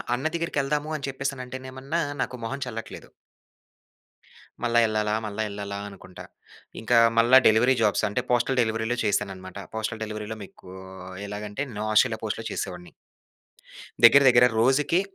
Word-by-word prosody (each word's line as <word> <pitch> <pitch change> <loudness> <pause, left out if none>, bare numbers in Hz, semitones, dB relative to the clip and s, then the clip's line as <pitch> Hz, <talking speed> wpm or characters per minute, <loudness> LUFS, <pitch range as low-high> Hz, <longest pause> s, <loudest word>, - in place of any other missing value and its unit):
అన్న 130 +4 -6
దెగ్గిరకెళ్దాము 150 -2 -1
అని 140 - -6
చెప్పేసి 135 0 -4
అంటేనేమన్నా, 130 +4 -5 0.2
నాకు 125 0 -3
మొహం 140 +4 -5
చెల్లట్లేదు. 115 -3 -8 1.6
మళ్ళా 120 0 +2
యెళ్ళాలా, 105 -1 0
మళ్ళా 105 +1 -3
యెళ్ళాలా 100 0 -6
అనుకుంటా. 95 -2 -12 0.6
ఇంకా 115 +2 +1 0.2
మళ్ళా 120 +3 +6
డెలివరీ 120 +4 +4
జాబ్స్ 105 0 +2
అంటే, 105 +4 -1
పోస్టల్ 125 +2 +1
డెలివరీలో 110 +1 -1
చేశానఅనమాట. 95 -2 -2 0.2
పోస్టల్ 110 0 -3
డెలివరీలో 110 0 -6
మీకూ 95 -1 -13 0.5
ఎలాగంటే, 105 +5 -5
నొఆషీలో 110 +2 +2
పోస్ట్‌లో 110 +1 -3
చేసేవాడిని. 90 -2 -6 1.1
దెగ్గిర 140 +4 +8
దెగ్గిర 125 0 +6
రోజుకి 140 +8 +3
115 Hz, 125 wpm, -25 LUFS, 105-130 Hz, 1.6 s, దెగ్గిర